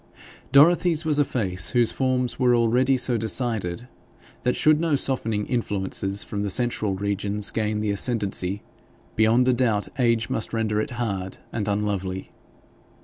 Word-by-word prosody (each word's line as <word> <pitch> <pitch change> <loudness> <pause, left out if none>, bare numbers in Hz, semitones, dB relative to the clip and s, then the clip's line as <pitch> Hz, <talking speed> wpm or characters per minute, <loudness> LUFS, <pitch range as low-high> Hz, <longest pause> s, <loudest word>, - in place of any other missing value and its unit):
Dorothy's 165 +3 +4
was 150 -2 +1
a - - +5
face 95 -9 0
whose 120 -2 +2
forms 130 -1 -1
were 125 -2 +3
already 125 +3 +2
so 125 -1 +1
decided 110 -2 -1 0.5
that, 125 - 0
should 155 0 +3
no 165 -3 +1
softening 115 -6 -1
influences 100 -4 0
from 100 - -5
the 100 - -2
central 110 -2 0
regions 100 +1 -2
gain 105 -1 -2
the 105 -1 -1
ascendancy, 100 -3 0 0.5
beyond 115 +3 +3
a 130 - +4
doubt 115 -5 0
age 115 -2 +1
must 110 - -3
render 110 -2 0
it 145 - -4
hard 100 -6 -4 0.2
and 105 -3 -3
unlovely. 100 -2 -3
115 Hz, 145 wpm, -23 LUFS, 100-125 Hz, 0.5 s, a